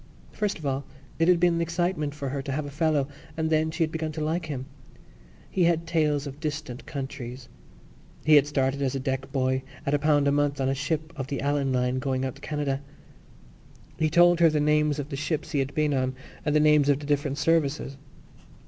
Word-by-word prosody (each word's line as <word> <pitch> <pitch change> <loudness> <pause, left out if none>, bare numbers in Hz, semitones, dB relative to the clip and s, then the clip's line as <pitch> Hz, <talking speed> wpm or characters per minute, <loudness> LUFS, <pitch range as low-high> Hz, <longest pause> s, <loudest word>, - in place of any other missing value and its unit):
First 210 -2 -1
of 160 - -9
all 135 0 -1 0.4
it 165 - +3
had 180 -1 +5
been 175 0 +4
an 170 - 0
excitement 170 -3 -1
for 140 -2 -4
her 140 +1 -3
to 135 0 -5
have 145 +2 -2
a 145 - -7
fellow 150 -2 +1 0.3
and 160 0 0
then 155 0 +2
she 160 +1 0
had 155 - -1
begun 160 -1 -3
to 155 0 -3
like 165 +2 -1
him. 135 -4 -4 0.8
He 180 -2 +1
had 170 -1 +2
tales 155 -3 +1
of 140 0 -7
distant 150 -5 -5
countries. 135 -3 -6 0.8
He 155 - +5
had 145 -1 +7
started 140 -1 0
as 135 -1 0
a - - -1
deck 135 0 -3
boy 130 -1 +1 0.2
at 140 - 0
a 145 - +3
pound 145 -1 +3
a - - +4
month 145 -1 +1
on 135 0 +1
a - - +2
ship 155 +3 -2
of 135 -3 -4
the 140 -1 -3
Allan 140 -1 0
Line 125 0 +1
going 130 -1 -1
out 130 - -3
to - - -17
Canada. 145 -3 -2 1.2
He 155 - +2
told 175 +1 +5
her 170 -1 +7
the 155 -1 +1
names 150 0 +2
of 145 0 -4
the 140 - -4
ships 150 +2 -2
he 145 - +1
had 135 +1 -2
been 150 -1 +2
on 130 -1 0 0.3
and 150 -1 0
the - - +6
names 150 -1 +5
of 140 - +4
the 145 - -8
different 145 -1 0
services. 150 -4 +1
145 Hz, 225 wpm, -26 LUFS, 135-155 Hz, 1.2 s, had